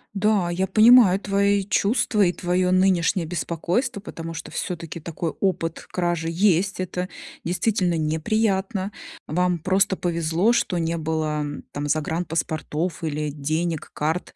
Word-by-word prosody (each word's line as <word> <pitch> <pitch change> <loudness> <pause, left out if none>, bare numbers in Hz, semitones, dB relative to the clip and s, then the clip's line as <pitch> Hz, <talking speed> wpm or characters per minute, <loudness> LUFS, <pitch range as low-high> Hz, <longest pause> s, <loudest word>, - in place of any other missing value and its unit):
Да, 200 -3 +2
я 190 +2 0
понимаю 215 -1 +7
твои 200 0 +1
чувства 205 +2 +1
и 175 - +3
твое 180 +1 0
нынешнее 185 -1 +2
беспокойство, 175 - -2
потому 165 -4 -7
что 165 - -7
всё-таки 170 -1 -4
такой 165 +1 -4
опыт 170 -4 -2
кражи 175 -2 -1
есть, 185 +2 +2
это 180 0 -3 0.3
действительно 180 0 0
неприятно, 190 +5 0 0.4
вам 180 +2 +1
просто 190 +3 +2
повезло, 170 +5 +1
что 180 -6 0
не 165 0 -1
было 155 -1 -1 0.3
там 145 +1 -4
загранпаспортов 160 +1 -2
или 150 -1 -2
денег, 155 +3 -2
карт. 160 +4 -2
175 Hz, 125 wpm, -23 LUFS, 165-195 Hz, 0.4 s, понимаю